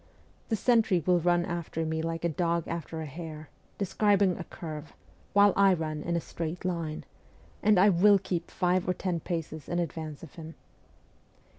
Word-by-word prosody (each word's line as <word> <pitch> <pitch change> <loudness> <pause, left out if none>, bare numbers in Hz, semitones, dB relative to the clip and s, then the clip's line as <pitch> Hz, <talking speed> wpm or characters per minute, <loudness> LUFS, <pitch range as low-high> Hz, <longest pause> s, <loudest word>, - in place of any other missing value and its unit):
The 225 - +2
sentry 220 - +3
will 180 -1 +4
run 175 0 +2
after 170 -2 -3
me 160 0 -1
like 165 +1 -3
a - - +2
dog 170 +1 0
after 165 -1 -4
a - - -4
hare, 155 +1 -8 0.3
describing 200 -1 +2
a 175 - -6
curve, 155 -2 -8 0.4
while 205 0 +6
I 195 -1 +5
run 155 -2 -3
in 170 +2 -2
a - - +2
straight 165 +2 -5
line, 165 -4 -3 0.6
and 210 -3 +4
I 200 +3 +7
will 200 +3 +6
keep 180 -3 -3
five 180 0 +1
or 180 - +1
ten 180 -2 -2
paces 160 -2 -5
in 175 - -1
advance 160 -3 -4
of 165 - -11
him. 160 -1 -9
170 Hz, 175 wpm, -29 LUFS, 160-185 Hz, 0.6 s, I